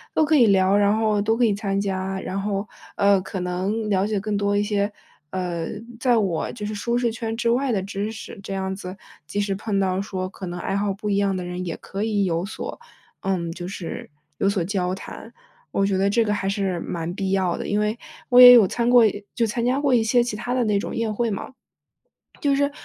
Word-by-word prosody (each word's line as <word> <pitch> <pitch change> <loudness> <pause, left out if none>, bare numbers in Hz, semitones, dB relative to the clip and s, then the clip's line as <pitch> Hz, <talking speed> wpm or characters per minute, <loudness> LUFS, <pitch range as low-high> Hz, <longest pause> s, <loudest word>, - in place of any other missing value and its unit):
都 310 - +4
可 310 +1 +3
以 245 -5 +6
聊， 190 -1 +4
然 205 +1 +3
后 215 -2 +1
都 225 +2 +1
可 245 - +4
以 215 - +3
参 200 -1 -1
加， 190 -1 -2
然 195 +1 -4
后， 200 0 -2 0.3
呃， 200 -1 +4
可 190 +1 -5
能 190 +5 -2
了 195 -1 +1
解 210 -2 -1
更 210 +1 -2
多 205 0 +1
一 205 - +2
些， 205 0 0 0.4
呃， 175 -3 -3 0.3
在 245 -3 +3
我 190 -6 0
就 210 -3 -6
是 215 - -3
舒 235 +3 -1
适 240 -2 +1
圈 225 0 -4
之 235 -1 +1
外 260 +2 +1
的 200 -4 0
知 200 +2 -3
识。 220 - -9
这 195 0 -5
样 190 0 -2
子， 185 -1 -8 0.3
即 205 - -3
使 200 -1 0
碰 200 0 -2
到 190 0 +1
说 185 -2 -4
可 185 0 -8
能 175 0 -5
爱 195 - -2
好 200 0 0
不 200 +2 -6
一 200 - +2
样 195 -2 +1
的 180 - -4
人 180 +1 -4
也 165 - -4
可 200 +2 -5
以 210 -3 +1
有 170 -1 0
所 220 - -6 0.4
嗯， 180 -4 -2
就 175 +1 -6
是 185 -3 -6 0.3
有 195 - +3
所 195 -4 0
交 185 0 -1
谈。 190 - -10 0.4
我 195 - +1
觉 195 - +1
得 195 - +3
这 230 +3 +3
个 210 - 0
还 195 -1 -1
是 195 -3 -1
蛮 170 0 -4
必 195 0 -3
要 190 -3 +1
的， - - -5
因 205 +1 +1
为， 210 +1 0 0.3
我 250 0 +8
也 245 0 +12
有 225 -6 +7
参 235 +4 0
过 245 -1 +7 0.3
就 235 - +2
参 230 +2 -2
加 255 +3 +1
过 280 -3 +2
一 235 - +5
些 240 +2 +3
其 240 -3 -3
他 235 +3 -5
的 250 0 +2
那 210 -3 +1
种 - - -5
宴 225 -2 -1
会 235 +2 0
嘛。 210 +6 -5 0.9
就 280 -1 +2
是， 285 +1 +1
200 Hz, 255 characters per minute, -23 LUFS, 190-225 Hz, 0.9 s, 也